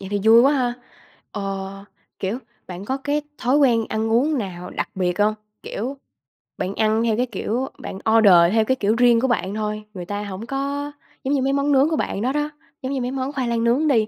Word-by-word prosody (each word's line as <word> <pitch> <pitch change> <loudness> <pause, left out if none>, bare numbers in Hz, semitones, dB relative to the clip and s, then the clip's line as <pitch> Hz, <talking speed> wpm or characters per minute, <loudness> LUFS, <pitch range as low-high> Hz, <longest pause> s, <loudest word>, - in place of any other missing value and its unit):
Vậy 195 - -7
thì 205 0 0
vui 225 +1 +8
quá 275 +4 +5
ha. 250 -4 0 0.6
Ờ, 195 -1 -5 0.3
kiểu, 200 +5 -2 0.3
bạn 185 +2 -7
có 260 +4 -1
cái 290 +2 -1 0.2
thói 255 +4 +2
quen 240 -6 +4
ăn 220 +1 -1
uống 280 +6 +2
nào 180 -5 -5
đặc - - -3
biệt 180 -1 -1
hông? 210 +1 +3 0.3
Kiểu, 255 +7 -4 0.6
bạn 195 +2 -3
ăn 220 +1 +2
theo 225 -2 +1
cái 250 - +2
kiểu, 250 +1 -2
bạn - - -6 0.2
order 210 -4 +7 0.2
theo 220 -1 +3
cái 260 - +2
kiểu 215 -3 +1
riêng 240 -1 +5
của 265 - +2
bạn 205 -6 0
thôi 215 0 -3
người 180 -3 -6
ta 205 +3 -4
hổng 200 +1 -6
có, 280 +2 -3 0.3
giống 270 - 0
như 280 - +2
mấy 270 +1 +1
món 280 +1 +1
nướng 275 +2 +4
của 325 - 0
bạn 200 - -2
đó 250 +4 +1
đó, 295 0 0 0.3
giống 260 0 -3
như 270 - -1
mấy 245 +1 -2
món 265 +1 -3
khoai 260 -3 -1
lang 230 -1 0
nướng 250 +7 +2
đi, 225 -7 +3
235 Hz, 230 wpm, -22 LUFS, 205-270 Hz, 0.6 s, vui